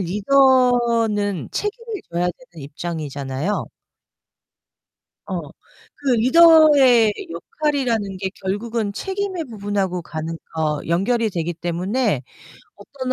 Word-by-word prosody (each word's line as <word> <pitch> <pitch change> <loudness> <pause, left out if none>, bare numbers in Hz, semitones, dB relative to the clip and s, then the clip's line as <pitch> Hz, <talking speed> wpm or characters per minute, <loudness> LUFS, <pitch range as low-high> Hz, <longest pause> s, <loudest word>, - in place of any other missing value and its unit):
리더는 230 - +2
책임을 435 0 -4
져야 170 +1 -1 0.3
되는 160 -4 -11
입장이잖아요. 150 +1 -4 1.6
어. - - -3 0.6
그 285 - -3
리더의 280 -5 +6 0.2
역할이라는 255 - -2
게 190 0 -3
결국은 210 +2 -2
책임의 380 - -3
부분하고 200 -5 -2
가는 160 -1 -5 0.2
어 155 -2 0
연결이 220 +7 +1
되기 175 -2 -3
때문에 180 - -1 0.5
어떤 260 -2 -5
210 Hz, 230 characters per minute, -21 LUFS, 175-265 Hz, 1.6 s, 리더의